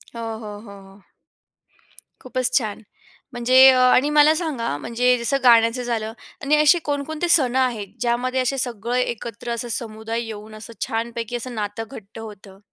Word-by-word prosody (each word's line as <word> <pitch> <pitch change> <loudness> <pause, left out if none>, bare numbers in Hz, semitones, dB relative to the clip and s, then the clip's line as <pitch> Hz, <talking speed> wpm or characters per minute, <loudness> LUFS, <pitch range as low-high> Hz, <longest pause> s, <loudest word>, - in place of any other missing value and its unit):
हो, 230 - -6 0.2
हो, 210 -2 -8
हो, 200 -3 -12
हो. 195 +1 -17 1.2
खूपच 255 -1 -2
छान! 220 -6 -3 0.5
म्हणजे 255 +2 +6
अ, 260 -1 +4
आणि 255 +3 +4
मला 300 +1 +5
सांगा, 295 - -3
म्हणजे 245 +8 +1
जसं 235 +4 0
गाण्याचं 230 0 +4
झालं 225 -2 -3 0.3
आणि 290 +2 +3
असे 305 +4 +5
कोण 285 -1 -1
कोणते 315 +4 -3
सण 260 -7 +3
आहेत, 245 -6 0
ज्यामध्ये 250 +2 0
असे 255 +2 -1
सगळं 245 -2 -2
एकत्र 235 -2 -4
असं 235 +1 -4
समुदाय 225 0 -2
येऊन 215 -1 -9
असं 225 +2 -11
छानपैकी 230 +1 -4
असं 240 0 -6
नातं 210 +1 -4
घट्ट 220 -3 -11
होतं? 205 -3 -11
235 Hz, 160 wpm, -22 LUFS, 220-255 Hz, 1.2 s, म्हणजे